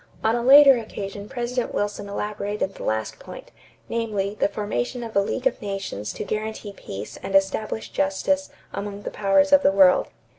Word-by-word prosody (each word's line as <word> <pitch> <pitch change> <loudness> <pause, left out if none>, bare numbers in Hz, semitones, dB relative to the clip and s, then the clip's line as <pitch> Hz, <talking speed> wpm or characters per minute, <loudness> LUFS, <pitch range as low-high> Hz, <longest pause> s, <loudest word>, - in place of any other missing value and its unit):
On 220 +1 +3
a 240 - -1
later 275 0 +8
occasion 205 -2 -7
President 245 0 -3
Wilson 205 0 -2
elaborated 205 -1 -3
the - - -12
last 110 0 -2
point, - - -11 0.4
namely, 210 -4 -2
the - - +3
formation 205 - -3
of 225 -1 -8
a - - +5
league 245 +6 -2
of 265 -1 +1
nations 195 - -4
to - - -5
guarantee 215 0 -4
peace 100 - -8
and 195 - -4
establish 205 +3 0
justice 280 +10 0 0.2
among 205 0 -5
the - - -5
powers 210 +9 +3
of 285 - +8
the - - +4
world. 190 -2 +5
205 Hz, 175 wpm, -24 LUFS, 195-235 Hz, 0.4 s, later